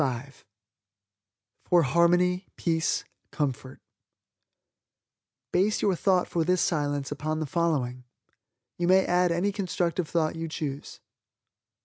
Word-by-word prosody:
FOR 175 -1 +4
HARMONY, 180 +5 +2
PEACE, 165 -2 0 0.2
COMFORT 135 -3 -3 1.7
Base 195 +4 +1
your 195 -3 +3
thought 185 0 +2
for 170 - 0
this 180 +2 +1
Silence 145 -5 -1
upon 155 +2 -2
the 155 - -2
following. 135 -6 -1 0.7
You 175 - +1
may 190 +1 +5
add 180 0 +2
any 175 +4 +1
constructive 180 -3 -2
thought 160 -2 0
you 165 0 -4
choose. 145 -3 -6
170 Hz, 105 wpm, -27 LUFS, 150-180 Hz, 1.7 s, may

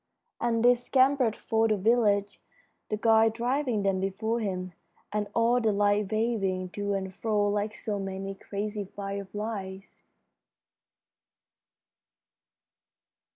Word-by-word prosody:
And 235 -1 +1
they 245 - +8
scampered 255 -1 +2
for 225 0 +1
the 215 -1 +1
village, 205 -1 +2 0.5
the 215 - -1
guide 225 0 +4
driving 245 -1 0
them 195 -1 +1
before 215 +5 -1
him, 185 -4 -3 0.4
and 210 -1 -1
all 235 +2 +3
the 220 -2 +2
lights 205 0 +2
waving 200 -5 0
to 205 +1 -2
and 190 -1 -4
fro 210 0 0
like 210 +1 -1
so 205 -2 -3
many 195 0 -4
crazy 205 +1 -4
fireflies. 200 0 -6
210 Hz, 110 wpm, -28 LUFS, 195-225 Hz, 0.5 s, they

